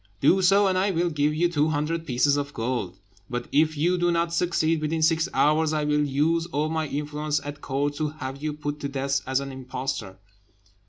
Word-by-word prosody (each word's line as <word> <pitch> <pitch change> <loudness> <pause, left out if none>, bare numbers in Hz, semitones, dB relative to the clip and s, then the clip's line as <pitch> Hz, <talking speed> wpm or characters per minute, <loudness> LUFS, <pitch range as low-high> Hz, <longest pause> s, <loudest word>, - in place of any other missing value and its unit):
Do 180 - +4
so, 195 +2 +5
and 185 -1 +2
I 195 +2 +2
will 175 -1 0
give 150 0 +1
you 175 +3 +3
two 155 -3 +1
hundred 160 +2 -2
pieces 140 +2 +3
of 145 0 -3
gold. 115 -6 -2 0.3
But 120 0 -4
if 155 +1 +2
you 175 +4 +2
do 175 0 +2
not 170 0 0
succeed 165 -2 +1
within 160 +1 -1
six 165 +2 +2
hours, 155 +1 +2
I 155 -1 0
will 150 0 +2
use 155 +4 +1
all 155 -2 -1
my 160 -1 -1
influence 150 +1 -2
at 145 0 -7
court 145 +1 -1
to 155 - 0
have 140 -2 -7
you 155 0 -1
put 145 0 -5
to 140 - -3
death 140 0 -1
as 130 0 +1
an 135 0 -6
impostor." 130 -6 -5
150 Hz, 210 wpm, -25 LUFS, 140-165 Hz, 0.3 s, so